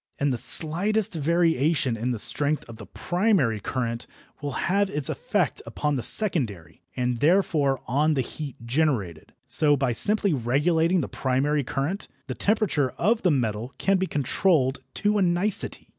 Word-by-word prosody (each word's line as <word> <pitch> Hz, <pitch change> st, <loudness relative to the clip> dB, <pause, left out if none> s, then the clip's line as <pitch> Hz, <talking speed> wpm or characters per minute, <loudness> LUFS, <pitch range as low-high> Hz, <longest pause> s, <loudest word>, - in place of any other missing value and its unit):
And 140 Hz, -1 st, 0 dB
the -, -, -2 dB
slightest 200 Hz, -, +1 dB
variation 160 Hz, -4 st, +1 dB
in 115 Hz, +3 st, -3 dB
the 120 Hz, -, -1 dB
strength 145 Hz, +7 st, -1 dB
of 115 Hz, -1 st, -10 dB
the 100 Hz, -, -11 dB
primary 175 Hz, -, 0 dB
current 115 Hz, +2 st, -3 dB, 0.3 s
will 145 Hz, -2 st, -4 dB
have 200 Hz, +2 st, +1 dB
its 150 Hz, -4 st, -2 dB
effect -, -, -1 dB
upon 150 Hz, -, -2 dB
the 130 Hz, -, -2 dB
secondary, 110 Hz, -, 0 dB
and 125 Hz, -2 st, -1 dB
therefore 150 Hz, -5 st, +2 dB
on 150 Hz, +4 st, +2 dB
the 135 Hz, -, +1 dB
heat 140 Hz, +2 st, -6 dB
generated. 115 Hz, -, -1 dB
So, 145 Hz, +3 st, +4 dB
by 135 Hz, -2 st, 0 dB
simply 200 Hz, -, +1 dB
regulating 160 Hz, +8 st, +1 dB
the -, -, -3 dB
primary 140 Hz, +3 st, 0 dB
current, 140 Hz, +10 st, -3 dB, 0.2 s
the 135 Hz, -, -4 dB
temperature 200 Hz, -, +1 dB
of 225 Hz, +2 st, +1 dB
the 180 Hz, -, +2 dB
metal 120 Hz, -3 st, -1 dB
can 195 Hz, 0 st, +2 dB
be 190 Hz, 0 st, -1 dB
controlled 140 Hz, -1 st, +1 dB
to 210 Hz, 0 st, +1 dB
a -, -, +1 dB
nicety. 180 Hz, +3 st, -1 dB
145 Hz, 160 wpm, -25 LUFS, 125-180 Hz, 0.3 s, So